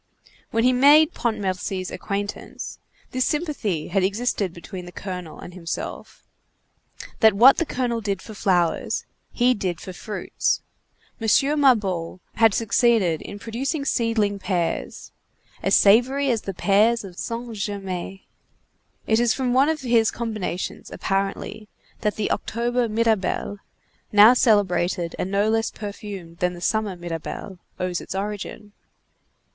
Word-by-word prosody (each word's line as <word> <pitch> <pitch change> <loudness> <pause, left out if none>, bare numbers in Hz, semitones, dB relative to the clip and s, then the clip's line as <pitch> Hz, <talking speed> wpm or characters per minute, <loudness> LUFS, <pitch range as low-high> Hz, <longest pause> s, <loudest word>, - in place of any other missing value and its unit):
When 225 0 +1
he 255 +1 +4
made 290 +5 +6
Pontmercy's 190 -4 -2
acquaintance, 200 0 -5 0.3
this 255 0 +1
sympathy 285 - -2
had 195 - +1
existed 200 -1 0
between 180 +2 -9
the - - -9
colonel 180 -2 -7
and 175 - -10
himself—that 185 +4 -4
what 245 +6 +8
the 335 - 0
colonel 245 -4 -1
did 200 -3 -2
for 215 - -10
flowers, 180 -5 0 0.3
he 250 +1 +3
did 185 -6 -3
for 185 - -8
fruits. 210 +4 -2 0.6
M. 225 - -1 0.3
Mabeuf 190 -10 +2
had 225 -3 +4
succeeded 225 -7 +2
in 200 - -8
producing 270 +7 -3
seedling 220 -5 +1
pears 180 -3 -2 0.5
as - - +3
savory 255 +7 +4
as 225 -2 0
the 195 - -5
pears 215 +5 +3
of 185 -3 -10
St. 235 0 -4
Germain; 195 -2 -4 0.8
it 220 0 +2
is 240 -2 +3
from 255 -2 0
one 270 +4 +4
of 315 -2 -1
his 235 -3 +3
combinations, 215 -6 -4
apparently, 195 +2 -3 0.3
that 210 -1 -1
the 215 - -1
October 240 +1 -1
Mirabelle, 215 -2 0 0.5
now 210 +3 +8
celebrated 180 -7 +2
and 185 - -2
no 200 +2 +2
less 225 +1 +1
perfumed 200 -5 -8
than 180 0 0
the - - -9
summer 210 +1 0
Mirabelle, 175 +2 -6 0.2
owes 180 -1 -2
its - - -7
origin. 210 +1 -5
210 Hz, 130 wpm, -23 LUFS, 185-235 Hz, 0.8 s, what